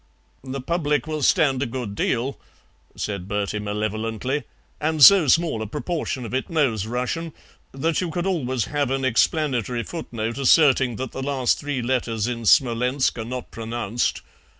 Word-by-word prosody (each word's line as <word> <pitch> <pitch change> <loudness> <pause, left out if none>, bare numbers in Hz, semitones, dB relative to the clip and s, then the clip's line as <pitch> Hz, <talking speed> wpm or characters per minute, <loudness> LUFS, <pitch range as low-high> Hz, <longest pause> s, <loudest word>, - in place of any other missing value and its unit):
"The 135 0 -5
public 150 0 0
will 155 -1 -3
stand 135 -1 +3
a 140 - 0
good 120 -4 -5
deal," 125 +6 -1 0.6
said 100 -3 -4
Bertie 105 +1 -2
malevolently, 110 +6 -2 0.3
"and 155 -1 +2
so 190 -1 +9
small 160 -5 +2
a 110 - -3
proportion 150 - -3
of 115 - -7
it 130 - -2
knows 125 - +1
Russian 125 +7 -3 0.4
that 160 +6 -1
you 180 - -2
could 175 +2 -3
always 130 - -1
have 145 0 -1
an 135 0 -1
explanatory 125 - +1
footnote 115 -7 -5
asserting 135 -3 +4
that 130 +2 -5
the 135 - -6
last 135 -2 0
three 145 -4 -3
letters 115 -4 -1
in 115 -2 -3
Smolensk 125 +3 +3
are - - -2
not 125 +1 -6
pronounced. 115 0 -2
130 Hz, 155 wpm, -23 LUFS, 115-145 Hz, 0.6 s, so